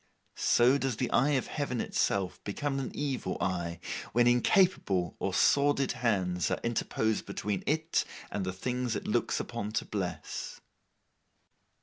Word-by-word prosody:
So 125 +4 +4
does 135 -4 -1
the 125 - -1
eye 145 +4 +3
of 130 - +1
Heaven 140 -5 -3
itself 95 -4 0
become 135 +7 -2
an 135 - -3
evil 135 -10 -2
eye, 85 -2 -2 0.3
when 120 +1 +4
incapable 120 - +3
or - - -1
sordid 140 -1 +3
hands 95 -7 0
are - - -1
interposed 110 -2 0
between 100 0 -2
it 160 +3 +1 0.3
and 100 - -2
the 95 - -2
things 125 +4 -2
it - - -4
looks - - +1
upon 105 +1 -4
to 115 - -1
bless. 95 -4 -4
120 Hz, 140 wpm, -30 LUFS, 95-135 Hz, 0.3 s, So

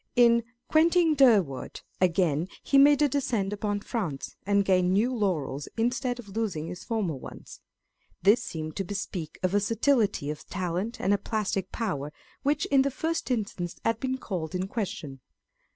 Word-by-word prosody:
In 235 -1 +5 0.2
Quentin 330 +1 +4
Durward, 215 - +3 0.2
again, 175 -3 +2 0.2
he 275 - +4
made 290 +1 +6
a - - +5
descent 240 -8 -1
upon 205 0 -2
France, 185 - -4
and 200 -1 +3
gained 185 -2 +3
new 230 +6 +2
laurels, 155 - -1
instead 245 +2 0
of 235 -4 -10
losing 195 -7 -2
his 180 +2 -7
former 215 -8 -1
ones. 130 - -10 0.6
This 210 +5 +5
seemed 155 -1 -5
to 195 - 0
bespeak 185 -4 -5
a - - +4
versatility 205 - +1
of 150 - -9
talent 185 +4 -3
and 200 - +2
a 200 - +1
plastic 200 -4 -2
power, 150 - -3 0.3
which 290 +1 +1
in 275 -1 +6
the 275 - +1
first 320 +4 -2
instance 200 -7 -2
had 225 -1 +1
been 260 0 -1
called 185 -8 -4
in 185 +1 -1
question. 180 - -4
205 Hz, 160 wpm, -27 LUFS, 180-245 Hz, 0.6 s, made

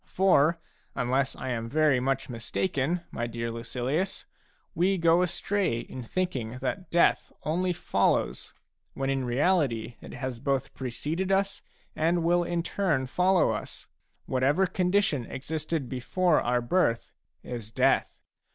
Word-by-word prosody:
For, 170 -4 +3 0.4
unless 130 +2 0
I 130 - -5
am 115 -2 -3
very 150 -2 +3
much 135 +1 -1
mistaken, 140 +7 -1
my 120 - -2
dear 115 0 -4
Lucilius, 125 +10 -2 0.5
we 190 +3 +2
go 170 0 +4
astray 180 - 0
in 130 - -8
thinking 125 -4 -3
that 135 +9 -4
death 170 - +3
only 180 +4 0
follows, 175 - 0 0.4
when 135 0 -1
in 135 -1 -1
reality 125 -4 +1
it - - -9
has 130 -3 -4
both 135 +1 -1
preceded 150 +9 -3
us 195 0 +1 0.3
and 165 +2 +1
will 175 +1 +3
in 170 -1 -1
turn 165 -9 0
follow 180 +7 +3
us. - - -6 0.4
Whatever 140 +8 +2
condition 180 - +1
existed 155 +1 -3
before 155 +8 +1
our 120 0 +1
birth, 120 -3 +1 0.3
is 115 -4 -6
death. 110 - +2
145 Hz, 135 wpm, -28 LUFS, 125-180 Hz, 0.5 s, go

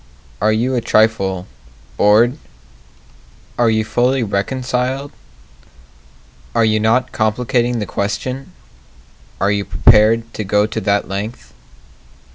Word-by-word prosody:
Are 110 +2 +3
you 120 +4 0
a 125 - 0
trifle 100 -5 +1 0.5
bored? 115 +7 +3 1.2
Are 120 -1 +2
you 110 -1 +1
fully 125 +3 +1
reconciled? 125 +6 -2 1.4
Are 115 - +3
you 110 0 +2
not 115 +4 +1
complicating 120 +2 0
the 105 - -2
question? 110 +8 -4 0.9
Are 100 +2 +1
you 100 -1 0
prepared 115 +2 +3
to 110 - -4
go 105 +1 +2
to 110 - -4
that 100 0 0
length? 100 +5 -6
110 Hz, 110 wpm, -17 LUFS, 105-125 Hz, 1.4 s, Are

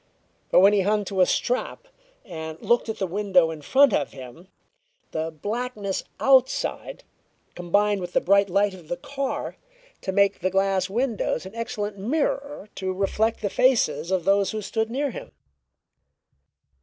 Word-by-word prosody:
But - - +5
when 200 +2 +6
he 205 - +3
hung 205 +2 +1
to 190 -1 -1
a 180 - +5
strap 255 - -2 0.4
and 160 -5 -7
looked 235 -1 +1
at 220 - -3
the 190 - -1
window 185 -3 +2
in 155 -2 -8
front 270 - +4
of 140 - -1
him, 130 +6 -11 0.6
the 160 0 -2
blackness 205 +4 -4 0.2
outside 265 -1 +1 0.5
combined 200 +3 +1
with 175 0 -6
the - - +4
bright 200 +1 +3
light 200 +2 +2
of 175 -4 -13
the 175 - -3
car 275 +8 -4 0.4
to 190 - -3
make 200 0 +2
the 185 - 0
glass 195 0 +1
of - - -4
the 195 - -12
windows 230 -8 -1
an 190 - -9
excellent 210 -3 -4
mirror 280 +1 -2
to 190 -1 -3
reflect 205 +4 0
the 205 - 0
faces 225 - +2
of 185 -3 0
those 195 0 +3
who 215 -1 -3
stood 220 +2 -2
near 275 +3 -1
him. - - -9
200 Hz, 170 wpm, -24 LUFS, 185-225 Hz, 0.6 s, when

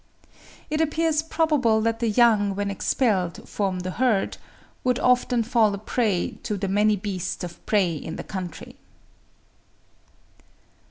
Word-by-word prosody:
It 305 +1 +1
appears 320 0 +1
probable 300 -8 +2
that 225 0 0
the 230 -1 +1
young 210 -3 +3
when 200 0 -2
expelled 195 -4 0
from 190 -3 -2
the 185 +1 -4
herd, 235 -3 +1 0.5
would 250 -1 +2
often 250 -2 +2
fall 225 -3 +2
a - - -6
prey 210 -3 -1
to 210 - -3
the 195 0 -2
many 210 +2 +3
beasts 190 -3 -4
of 175 -1 -8
prey 180 -8 +1
of 160 - -5
the - - -5
country. 185 -4 -7
215 Hz, 140 wpm, -24 LUFS, 195-245 Hz, 0.5 s, young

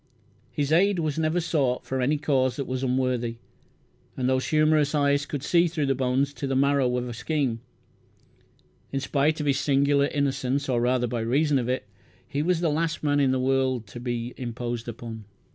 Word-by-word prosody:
His 145 0 -2
aid 195 +4 +4
was 155 -2 -1
never 160 +2 +1
sought 145 -7 0
for 130 0 -2
any 145 +4 +2
cause 135 -4 +1
that 140 - -3
was 130 0 -3
unworthy, 125 -2 0 0.8
and 125 - 0
those 130 0 +1
humorous 155 -1 +3
eyes 145 0 +2
could 145 -2 -4
see 175 +2 +3
through 160 -3 -1
the 135 - +2
bones 135 +2 0
to 140 - -4
the 135 - -1
marrow 135 -2 +2
of 125 0 -3
a 120 - -5
scheme. 130 -2 -1 1.3
In 135 - -1
spite 145 +3 +1
of 150 - -2
his 140 -1 +2
singular 140 0 +3
innocence, 140 -1 -1
or 120 -3 +1
rather 125 0 +2
by 120 0 -3
reason 140 +5 +2
of 120 0 -3
it, 130 -4 -1 0.4
he 145 0 -2
was 175 +1 +1
the 165 -3 +1
last 160 +1 -1
man 145 -1 +2
in 140 -2 +3
the 130 0 +1
world 130 -2 +1
to 120 - -8
be 120 0 -3
imposed 120 -1 -4
upon. 115 -1 -7
135 Hz, 195 wpm, -26 LUFS, 125-150 Hz, 1.3 s, aid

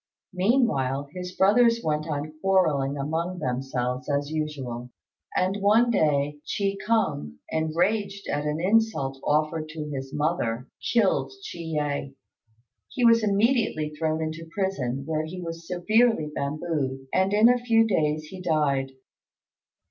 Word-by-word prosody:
Meanwhile, 180 - +1
his 180 -1 -6
brothers 230 +5 +4
went 155 0 -1
on 150 0 -3
quarrelling 155 -8 +2
among 165 +6 -2
themselves 125 -2 -2
as 145 +1 -1
usual; 135 -6 -4 0.5
and 185 +2 +1
one 225 +4 +4
day 145 -6 +1 0.2
Chi 200 -1 0
kung, 190 - 0 0.2
enraged 190 +6 0
at 145 0 -1
an 150 +1 -1
insult 185 -9 +1
offered 155 +1 0
to 155 -1 -6
his 135 -1 -5
mother, 145 -6 -1 0.2
killed 225 -5 +2 0.2
Chi - - -9
yeh. 150 -4 -2 0.8
He 250 - 0
was 230 -1 +6
immediately 205 - +1
thrown 155 +1 -1
into 160 +1 -5
prison, 140 -9 -2
where 155 0 -1
he 180 +4 -7
was 165 -1 -7
severely 185 -2 +2
bambooed, 140 -3 -2
and 190 +1 +2
in 210 +2 +6
a 245 0 +4
few 225 -2 +3
days 155 -7 +1
he 185 +4 -9
died. 140 -6 +1
160 Hz, 135 wpm, -26 LUFS, 145-195 Hz, 0.8 s, was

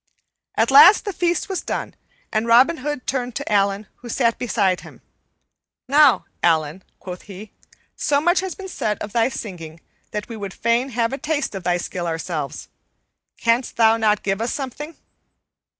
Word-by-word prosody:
At - - +2
last 310 +12 +8
the 405 - -3
feast 345 -2 0
was 385 -2 -3
done, - - -4 0.4
and 220 +1 0
Robin 255 +8 +5
Hood 295 -1 -4
turned 250 -3 -2
to - - -4
Allan, 200 0 +1
who 240 - -11
sat 235 -1 +1
beside 200 -6 0
him. - - -14 0.9
"Now, 285 0 +5 0.2
Allan," 160 +1 +1 0.2
quoth 180 -1 -8
he, 200 +2 -10 0.4
"so 280 - +1
much 350 +4 +2
has 375 -2 -4
been 390 - -8
said 220 - -2
of 210 - -7
thy 230 +1 +2
singing 170 -9 -8 0.3
that 210 - -5
we 230 - -7
would 200 -3 -7
fain 235 +3 +1
have 235 0 -1
a 270 - -4
taste 300 -2 -2
of 190 -2 -6
thy 175 0 +1
skill 175 0 -4
ourselves. 160 -3 -4 0.7
Canst 235 +2 0
thou 225 -1 +5
not 215 -2 +1
give 195 +1 -1
us 230 - -1
something?" 295 +4 -6
230 Hz, 170 wpm, -21 LUFS, 195-275 Hz, 0.9 s, last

